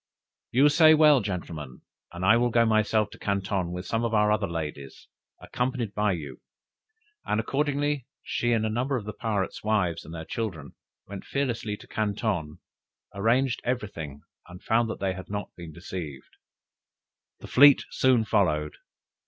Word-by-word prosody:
"You 135 +4 +5
say 155 +1 +6
well, 150 -4 +6
gentlemen! 80 -9 -6 0.3
and 90 +2 -4
I 110 - +6
will 120 +1 +2
go 115 0 +3
myself 110 -1 +2
to - - -13
Canton 95 -3 -1
with 90 +1 -5
some 115 +5 -1
other 105 -2 +2
of 105 0 +1
our 100 - -1
ladies, 75 -5 -6 0.3
accompanied 125 -4 -3
by 105 -1 +1
you!" 75 -6 -7 0.8
And 105 - 0
accordingly, 145 +1 -1 0.2
she 120 - -1
and 110 -1 +1
a - - 0
number 125 +5 -1
of 110 - -6
the 105 - -5
pirates' 105 -4 -3
wives 90 -6 0
with 80 - -10
their 80 -1 -6
children, 90 -11 -5 0.3
went 100 -1 -8
fearlessly 120 -6 -2
to - - -15
Canton, 100 -7 -2 0.6
arranged 120 +5 +1
every 125 -4 -2
thing, 75 -6 -8 0.2
and 90 +1 -12
found 115 0 +2
they 95 -1 -1
had 95 0 -9
not 105 0 -4
been 85 -2 -9
deceived. 80 -4 -8 1.0
The - - -12
fleet 140 +1 +7
soon 125 -4 +3
followed. 80 -8 +1
105 Hz, 160 wpm, -26 LUFS, 90-120 Hz, 1.0 s, fleet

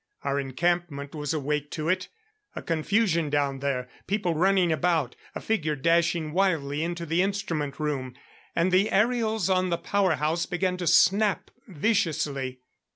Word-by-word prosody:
Our 140 0 0
encampment 145 +1 -1
was 150 -2 -3
awake 150 -1 -2
to 155 0 -3
it! 185 +3 0 0.5
A - - -6
confusion 170 0 +1
down 140 -2 0
there; 130 -2 -2 0.2
people 195 -3 0
running 180 +1 +3
about; 160 -5 +1 0.2
a - - -3
figure 155 -9 -1
dashing 165 +1 +1
wildly 160 -5 0
into 170 0 -3
the 165 +2 +1
instrument 180 -8 -2
room. 135 -4 -3 0.4
And 170 +2 +2
the 190 +3 +3
aerials 220 -2 +1
on 185 -1 +2
the 170 - 0
power 195 -4 +1
house 155 +4 -1
began 180 +1 -1
to 175 -2 -3
snap 195 +5 +3 0.2
viciously. 145 - -1
165 Hz, 150 wpm, -26 LUFS, 145-185 Hz, 0.5 s, running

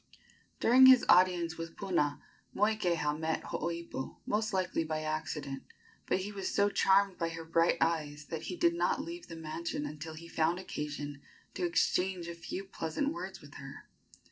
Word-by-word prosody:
During 260 +3 +7
his 260 -2 +8
audience 175 -2 +4
with 165 0 -6
Puna, 170 -7 0 0.3
Moikeha 180 -8 +1
met 160 0 -1
Hooipo 170 -5 -4
most 215 +1 0
likely 185 -3 0
by 155 -1 -3
accident, 150 -3 -3 0.5
but 185 - +1
he 205 +2 -5
was 195 -2 -3
so 200 0 +3
charmed 195 -1 +3
by 165 -1 0
her 165 0 -7
bright 165 +1 +3
eyes 150 -3 0
that 160 -1 -3
he 180 - -4
did 170 -1 +3
not 175 +9 +1
leave 340 +1 -8
the 165 - -8
mansion 160 -1 -4
until 155 +2 -6
he 170 +2 -10
found 165 +1 +1
occasion 145 -5 -5 0.3
to 180 - -1
exchange 180 +1 +1
a 170 - -4
few 170 +3 -6
pleasant 195 - -2
words 345 - -6
with - - -14
her. - - -10
170 Hz, 170 wpm, -32 LUFS, 155-190 Hz, 0.5 s, his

